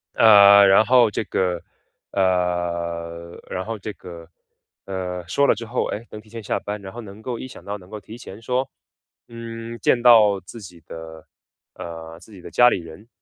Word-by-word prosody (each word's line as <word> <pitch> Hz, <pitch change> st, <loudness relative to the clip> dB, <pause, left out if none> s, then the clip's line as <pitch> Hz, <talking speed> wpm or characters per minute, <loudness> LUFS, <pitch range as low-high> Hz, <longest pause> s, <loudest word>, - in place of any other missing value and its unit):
呃， 100 Hz, -2 st, +8 dB
然 95 Hz, +3 st, +6 dB
后 125 Hz, -3 st, +5 dB
这 -, -, -2 dB
个， 90 Hz, -2 st, -1 dB, 0.5 s
呃 85 Hz, -2 st, -2 dB
然 90 Hz, -, -3 dB
后 115 Hz, 0 st, -4 dB
这 105 Hz, +1 st, -7 dB
个， 85 Hz, -2 st, -11 dB, 0.6 s
呃 90 Hz, -2 st, -5 dB
说 140 Hz, +9 st, +2 dB
了 -, -, +5 dB
之 115 Hz, +2 st, -7 dB
后， 120 Hz, +3 st, -2 dB
诶， 115 Hz, +3 st, -5 dB
能 105 Hz, -, -8 dB
提 105 Hz, -, -18 dB
前 115 Hz, 0 st, -8 dB
下 -, -, -1 dB
班， 105 Hz, 0 st, -6 dB
然 95 Hz, -1 st, -9 dB
后 120 Hz, -, -8 dB
能 105 Hz, 0 st, -12 dB
够 120 Hz, 0 st, -4 dB
一 130 Hz, -, -7 dB
想 -, -, -13 dB
到 100 Hz, +1 st, -5 dB
能 90 Hz, -1 st, -17 dB
够 105 Hz, -1 st, -7 dB
提 110 Hz, +4 st, -12 dB
前 110 Hz, -2 st, -11 dB
说， 125 Hz, +3 st, -1 dB, 0.6 s
嗯 115 Hz, 0 st, -8 dB
见 120 Hz, -, +2 dB
到 110 Hz, -5 st, +6 dB
自 100 Hz, +6 st, -11 dB
己 90 Hz, -4 st, -12 dB
的， 80 Hz, -1 st, -10 dB, 0.5 s
呃 80 Hz, -1 st, -9 dB
自 110 Hz, -, -17 dB
己 95 Hz, -, -12 dB
的 85 Hz, -, -11 dB
家 120 Hz, +6 st, +6 dB
里 -, -, +1 dB
人。 85 Hz, +7 st, -13 dB
100 Hz, 210 characters per minute, -22 LUFS, 90-115 Hz, 0.6 s, 呃